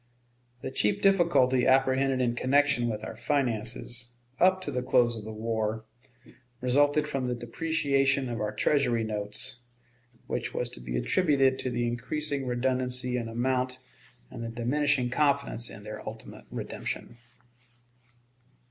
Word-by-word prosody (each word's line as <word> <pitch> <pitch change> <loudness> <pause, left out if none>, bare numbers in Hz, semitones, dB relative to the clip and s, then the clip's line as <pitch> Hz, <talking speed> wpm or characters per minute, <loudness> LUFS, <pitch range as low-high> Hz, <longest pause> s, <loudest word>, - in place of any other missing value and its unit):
The 130 - -3
chief 105 -5 +1
difficulty 170 -10 +4
apprehended 130 0 +3
in 120 -1 +1
connection 130 0 +2
with 105 -1 -4
our - - -6
finances, 120 -3 -2 0.3
up 185 +1 +5
to - - -4
the 125 - -1
close 125 -2 +3
of 110 -2 -7
the 110 - -6
war, 110 0 -2 0.7
resulted 145 +4 +3
from 135 -3 -2
the 125 - -1
depreciation 140 +1 +1
of 120 -2 -3
our 105 0 -1
Treasury 120 +1 +2
notes, 105 +1 -2 0.7
which - - -3
was - - -2
to - - -7
be - - -3
attributed 135 - +2
to 130 - -1
the 120 -1 -1
increasing 140 +3 -2
redundancy 125 0 0
in 120 -2 -2
amount 125 +2 0 0.5
and 115 - -6
the 115 - -4
diminishing 125 +2 +1
confidence 140 -4 +1
in 100 - -10
their 110 0 -7
ultimate 110 0 -11
redemption. 120 - -5
125 Hz, 140 wpm, -28 LUFS, 115-140 Hz, 0.7 s, up